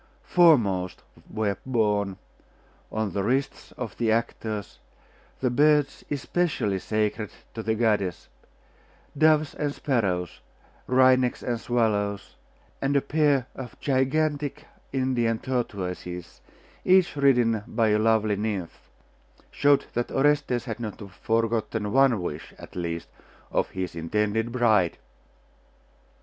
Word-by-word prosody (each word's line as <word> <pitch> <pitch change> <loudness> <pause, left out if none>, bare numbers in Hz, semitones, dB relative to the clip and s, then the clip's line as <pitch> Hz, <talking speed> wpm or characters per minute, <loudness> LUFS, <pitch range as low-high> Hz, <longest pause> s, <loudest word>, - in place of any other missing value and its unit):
Foremost 110 - +3 0.3
were 105 -3 -1
borne, 105 -6 0 0.7
on 110 -4 -2
the 100 - 0
wrists 130 +7 -1
of 125 -4 -6
the 115 -2 +2
actors, 110 -2 -2 0.6
the 125 -2 +1
birds 145 +1 +3
especially 145 - -1
sacred 105 +1 -1 0.2
to 115 - -5
the 110 0 0
goddess 105 -6 0 0.9
doves 155 0 +3
and 145 -1 -2
sparrows, 95 - -1 0.5
wrynecks 130 -1 +4
and 120 -2 -1
swallows; 105 -4 -1 0.5
and 140 +1 +1
a - - +6
pair 145 -2 +2
of 130 -2 -9
gigantic 145 +2 0 0.3
Indian 125 -4 +1
tortoises, 90 -8 -4 0.4
each 185 -3 +4
ridden 120 -6 +3
by 110 -1 +1
a 105 0 +3
lovely 110 -1 +2
nymph, 100 -4 -4 0.6
showed 145 -1 +3
that 120 0 -1
Orestes 140 -3 +1
had 115 -2 -5
not 110 -3 -5
forgotten 110 0 -1
one 135 -3 +4
wish, 80 -4 -6
at - - -12
least, 85 -1 -3 0.4
of - - 0
his 95 -2 -5
intended 105 +7 -1
bride. 110 -8 +2
115 Hz, 110 wpm, -26 LUFS, 105-135 Hz, 0.9 s, a